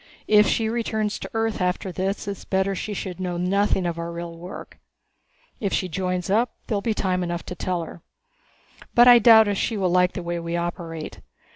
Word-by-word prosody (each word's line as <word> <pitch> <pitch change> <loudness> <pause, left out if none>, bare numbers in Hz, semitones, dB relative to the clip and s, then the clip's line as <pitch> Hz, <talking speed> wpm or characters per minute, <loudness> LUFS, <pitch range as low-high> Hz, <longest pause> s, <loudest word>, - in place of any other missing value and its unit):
If 210 0 +6
she 225 - +1
returns 220 -2 -2
to - - -7
Earth 225 -2 -1
after 180 +1 -1
this 195 +3 -3
it's 200 -1 -5
better 190 0 0
that 195 - -3
she 210 +2 -4
should 185 -1 -5
know 180 -2 -3
nothing 190 +1 +1
of 170 -1 -2
our 170 0 -4
real 170 0 -6
work. 175 +3 -10 0.8
If 200 -3 -2
she 185 - 0
joins 180 +1 -2
up, 225 +5 +1
there'll 205 -2 -1
be 220 +1 -1
time 185 -2 0
enough 175 -1 -3
to 180 - -6
tell 180 -1 -2
her. 165 - -10 0.9
But 240 +1 +7
I 245 -1 +9
doubt 220 -1 +7
if 200 -1 -1
she 225 - -1
will 185 -3 +1
like 180 0 +3
the 180 - -5
way 170 0 -3
we 170 0 -3
operate. 170 -2 -5
185 Hz, 210 wpm, -24 LUFS, 175-210 Hz, 0.9 s, I